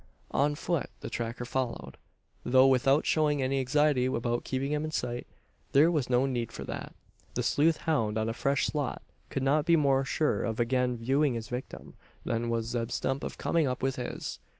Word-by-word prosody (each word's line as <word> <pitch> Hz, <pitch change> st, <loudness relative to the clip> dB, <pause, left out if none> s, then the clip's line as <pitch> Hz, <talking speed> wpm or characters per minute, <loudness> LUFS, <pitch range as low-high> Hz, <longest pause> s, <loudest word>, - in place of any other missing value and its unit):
On 145 Hz, +2 st, +2 dB
foot 170 Hz, +1 st, -2 dB
the -, -, -6 dB
tracker 120 Hz, +1 st, -3 dB
followed; 120 Hz, -, -3 dB, 0.5 s
though 130 Hz, +1 st, +5 dB
without 135 Hz, +2 st, +4 dB
showing 150 Hz, -2 st, +2 dB
any 135 Hz, +1 st, +1 dB
anxiety 135 Hz, 0 st, +2 dB
about 120 Hz, -1 st, -1 dB
keeping 135 Hz, +2 st, -2 dB
him 150 Hz, 0 st, 0 dB
in 155 Hz, -, -2 dB
sight. 120 Hz, -5 st, -3 dB, 0.5 s
There 150 Hz, +5 st, +6 dB
was 150 Hz, -7 st, 0 dB
no 125 Hz, +1 st, +3 dB
need 120 Hz, -4 st, -2 dB
for -, -, -7 dB
that. -, -, -6 dB, 0.4 s
The -, -, 0 dB
sleuth 160 Hz, +2 st, +3 dB
hound 115 Hz, -10 st, 0 dB
on 110 Hz, 0 st, 0 dB
a 115 Hz, -, -1 dB
fresh 140 Hz, +4 st, +1 dB
slot 145 Hz, -4 st, -2 dB, 0.3 s
could 135 Hz, -, -2 dB
not 145 Hz, +3 st, +3 dB
be 170 Hz, -, +6 dB
more 135 Hz, -3 st, +3 dB
sure 150 Hz, +3 st, 0 dB
of 115 Hz, -1 st, -2 dB
again 125 Hz, +1 st, +1 dB
viewing 135 Hz, +3 st, +1 dB
his 115 Hz, -1 st, -5 dB
victim, 125 Hz, +1 st, -6 dB, 0.3 s
than 115 Hz, 0 st, -1 dB
was 115 Hz, -1 st, 0 dB
Zeb 115 Hz, -1 st, -2 dB
Stump 135 Hz, +3 st, -2 dB
of -, -, -5 dB
coming 165 Hz, -4 st, +1 dB
up 125 Hz, 0 st, -3 dB
with 135 Hz, 0 st, 0 dB
his. 125 Hz, -, -5 dB
130 Hz, 195 wpm, -29 LUFS, 120-145 Hz, 0.5 s, There